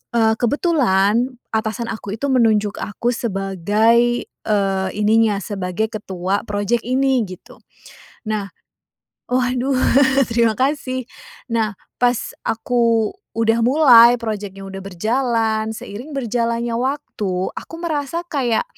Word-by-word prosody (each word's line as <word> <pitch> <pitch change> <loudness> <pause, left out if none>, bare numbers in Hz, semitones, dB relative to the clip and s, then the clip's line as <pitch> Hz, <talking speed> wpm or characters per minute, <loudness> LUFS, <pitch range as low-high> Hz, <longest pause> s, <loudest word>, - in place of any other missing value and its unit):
eee, 220 -1 +4
kebetulan, 245 - +2 0.2
atasan 220 +2 -2
aku 205 -2 -5
itu 280 - -2
menunjuk 215 -5 +2
aku 235 +3 -2
sebagai, 220 +4 +1
eee, 195 -2 -1
ininya, 215 -1 +3
sebagai 190 +2 -2
ketua 195 -2 -3
project 205 +3 -1
ini 260 -1 +2
gitu. 185 -1 -12 0.7
Nah 210 -2 -2 0.8
waduh 255 +1 +1 0.5
terima 230 -1 +2
kasih. 260 -1 -1 0.4
Nah, 225 -1 0 0.3
pas 245 -1 0
aku 230 -1 +1 0.2
udah 225 0 +1
mulai, 245 -3 +7
project-nya 205 -3 -5
udah 195 0 -7
berjalan, 220 +2 0
seiring 220 +6 -8
berjalannya 235 -2 -1
waktu, 230 -8 -2
aku - - -8
merasa 320 -1 -2
kayak, 250 -7 0
230 Hz, 105 wpm, -20 LUFS, 205-245 Hz, 0.8 s, mulai